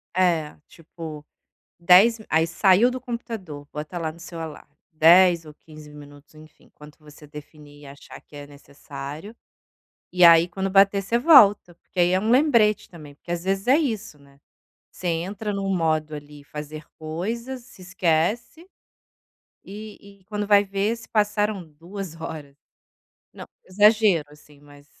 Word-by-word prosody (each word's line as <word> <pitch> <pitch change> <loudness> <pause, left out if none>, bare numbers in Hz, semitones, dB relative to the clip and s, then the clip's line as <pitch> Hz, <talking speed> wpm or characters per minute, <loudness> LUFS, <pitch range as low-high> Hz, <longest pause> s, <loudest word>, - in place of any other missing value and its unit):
É, 170 -5 0
tipo, 160 -2 -11 0.5
10 190 +7 +5
aí 160 +1 +2
saiu 190 +7 +3
do 255 +1 -5
computador, 225 - -7
bota 150 +4 -7
lá 160 -2 -3
no 165 - -18
seu 170 0 -10
alarme, 155 -3 -9 0.2
10 170 +2 +5
ou 155 - -12
15 155 -1 -15
minutos. 145 0 -15
Enfim, 155 0 -19
quanto 150 0 -16
você 150 0 -16
definir 150 0 -14
e - - -14
achar 140 0 -13
que 145 - -19
é 145 0 -10
necessário. 145 +6 -10 0.8
E 180 0 +3
aí, 170 0 +7
quando 190 +2 -4
bater 195 +1 +4
você 230 +5 -1
volta, 215 - +5
porque 180 - -10
aí 175 0 +3
é 185 - +2
um 215 - -3
lembrete 235 -5 +2
também, 150 -5 -13
porque 170 - -11
às 175 0 -3
vezes 195 +1 -2
é 265 +3 +5
isso, 220 - -4
né. 140 0 -23 0.5
Você 180 - -6
entra 195 +6 -3
no 195 -1 -4
modo 160 -4 -1
ali 145 -1 -11
"fazer 150 +1 -9
coisas", 225 +11 -5
se 215 -6 -17
esquece, 185 - -2 1.0
e 200 -1 -12
e - - -30
quando 210 +1 -5
vai 205 0 +4
ver 200 +3 -2
se 230 - -15
passaram 210 -2 0
2 170 +2 -9
horas. 150 -3 -8 0.8
Não, - - -11 0.2
exagero 205 -3 +3
assim, 150 -1 -20
eh, - - -24
mas 145 0 -18
175 Hz, 160 wpm, -23 LUFS, 150-205 Hz, 1.0 s, aí